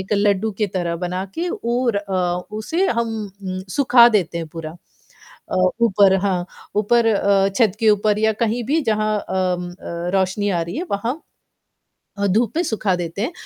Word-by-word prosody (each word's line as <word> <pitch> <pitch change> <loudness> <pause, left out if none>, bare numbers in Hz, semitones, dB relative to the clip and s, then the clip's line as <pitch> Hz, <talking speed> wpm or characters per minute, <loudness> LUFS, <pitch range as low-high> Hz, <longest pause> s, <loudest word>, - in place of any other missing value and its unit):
एक 190 +2 -5
लड्डू 205 +1 +2
के 210 - +2
तरह 170 -2 -1
बना 180 +2 -3
के 345 +2 -2
और 245 - -1
अ, 200 -1 -4 0.4
उसे 330 - 0
हम 235 -5 0 0.3
उम, 185 0 -4
सुखा 245 +1 +6
देते 180 -7 0
हैं 165 - -4
पूरा। 160 0 -8 0.7
अ, - - -2 0.3
ऊपर 200 -3 +5
हाँ, 185 -3 -1 0.3
ऊपर 225 +3 +3
अ, 200 -2 +3
छत 225 -6 +4
के 225 - +3
ऊपर 210 0 +2
या 220 0 +2
कहीं 230 +2 0
भी 295 +7 +1
जहाँ 215 -3 0
अम, 180 -1 -1
अ, 175 0 -5
रोशनी 195 +2 +1
आ 175 -3 0
रही 170 +6 -6
है 325 - -2
वहाँ 235 +10 -2 1.0
अ, 200 0 +1
धूप 220 +3 +1
में 345 - +2
सुखा 205 - 0
देते 175 +2 -4
हैं 245 +10 -1
205 Hz, 180 wpm, -20 LUFS, 185-230 Hz, 1.0 s, सुखा